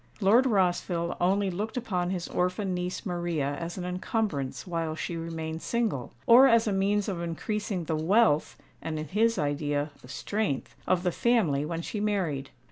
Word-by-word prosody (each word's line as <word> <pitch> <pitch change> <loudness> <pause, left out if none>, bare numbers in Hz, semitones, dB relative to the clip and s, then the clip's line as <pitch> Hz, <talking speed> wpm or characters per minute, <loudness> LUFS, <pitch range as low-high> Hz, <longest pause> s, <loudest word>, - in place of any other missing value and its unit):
Lord 230 +6 +5
Rossville 175 -4 +1
only 195 +2 +2
looked 210 +7 -4
upon 180 -8 -1
his 180 -2 -3
orphan 185 +2 -1
niece 180 +4 -3
Maria 170 -6 -1
as 170 +1 -5
an 180 - -4
encumbrance 180 - -2
while 165 -3 -2
she 170 - -4
remained 165 -1 -4
single, 220 - -1
or 250 +3 +8
as 230 -1 +4
a 210 - 0
means 200 +1 +1
of 185 -4 -3
increasing 185 +3 -3
the 160 0 -1
wealth 160 0 +3 0.2
(and 160 -1 -3
in 155 -1 -5
his 225 +5 +2
idea, 145 0 -1
the - - -14
strength) 200 +1 -2
of 180 -1 +2
the 180 - +1
family 170 -12 +2
when 165 +1 -3
she 210 - -4
married. 175 -10 -1
180 Hz, 170 wpm, -28 LUFS, 160-205 Hz, 0.2 s, or